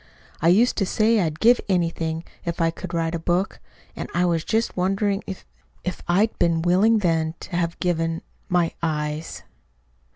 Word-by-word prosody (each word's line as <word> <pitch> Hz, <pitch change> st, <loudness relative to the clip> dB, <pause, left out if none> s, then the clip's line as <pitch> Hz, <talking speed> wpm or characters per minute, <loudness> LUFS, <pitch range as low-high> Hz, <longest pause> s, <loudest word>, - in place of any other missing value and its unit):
I 165 Hz, -, +3 dB
used 215 Hz, +8 st, +4 dB
to 195 Hz, -, +2 dB
say 220 Hz, +2 st, +3 dB
I'd 160 Hz, -4 st, -1 dB
give 240 Hz, +2 st, +5 dB
anything 165 Hz, -3 st, 0 dB, 0.2 s
if 170 Hz, 0 st, -3 dB
I 165 Hz, -1 st, +2 dB
could 180 Hz, +1 st, -8 dB
write 165 Hz, -1 st, -1 dB
a 170 Hz, -, -1 dB
book; 175 Hz, +4 st, -1 dB, 0.4 s
and -, -, -5 dB
I 175 Hz, +1 st, +3 dB
was 165 Hz, -2 st, +1 dB
just 225 Hz, +4 st, 0 dB
wondering 195 Hz, +2 st, 0 dB
if 190 Hz, -, -7 dB, 0.4 s
if 180 Hz, -2 st, -4 dB
I'd 200 Hz, +6 st, +2 dB
been 165 Hz, -1 st, +2 dB
willing 195 Hz, +6 st, +4 dB
then 165 Hz, -4 st, +1 dB
to 185 Hz, -, -6 dB
have 170 Hz, -1 st, -1 dB
given 165 Hz, -2 st, -1 dB, 0.3 s
my 175 Hz, -2 st, +2 dB
eyes!" 150 Hz, -1 st, -3 dB
175 Hz, 170 wpm, -23 LUFS, 165-195 Hz, 0.4 s, give